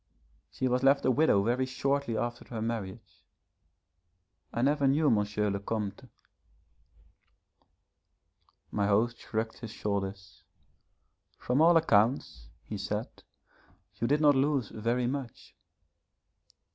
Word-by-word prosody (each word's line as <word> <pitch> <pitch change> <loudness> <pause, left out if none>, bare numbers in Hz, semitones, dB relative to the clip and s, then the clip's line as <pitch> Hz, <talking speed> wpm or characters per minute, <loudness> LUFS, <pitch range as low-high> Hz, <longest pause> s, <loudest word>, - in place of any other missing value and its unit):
She 130 - -2
was 125 0 +1
left 135 +1 +3
a 130 - +4
widow 125 -7 +3
very 125 +4 0
shortly 135 -2 -1
after 120 +1 -3
her 115 - -6
marriage. 105 -4 -5 1.3
I 120 - -2
never 145 0 +2
knew 145 +4 +2
M. 105 -1 +1
le 100 - -2
Comte.' 105 0 -4 2.6
My 100 -1 0
host 115 +3 +1
shrugged 110 0 -4
his 115 - -7
shoulders. 100 -2 -4 1.0
'From 125 +4 0
all 170 +1 +6
accounts,' 110 - +1 0.2
he 105 - -6
said, 105 +3 -3 0.8
'you 115 +3 -2
did 145 +4 +2
not 145 -1 +6
lose 135 -3 +1
very 120 +3 -1
much.' 130 -1 -5
115 Hz, 115 wpm, -29 LUFS, 105-135 Hz, 2.6 s, all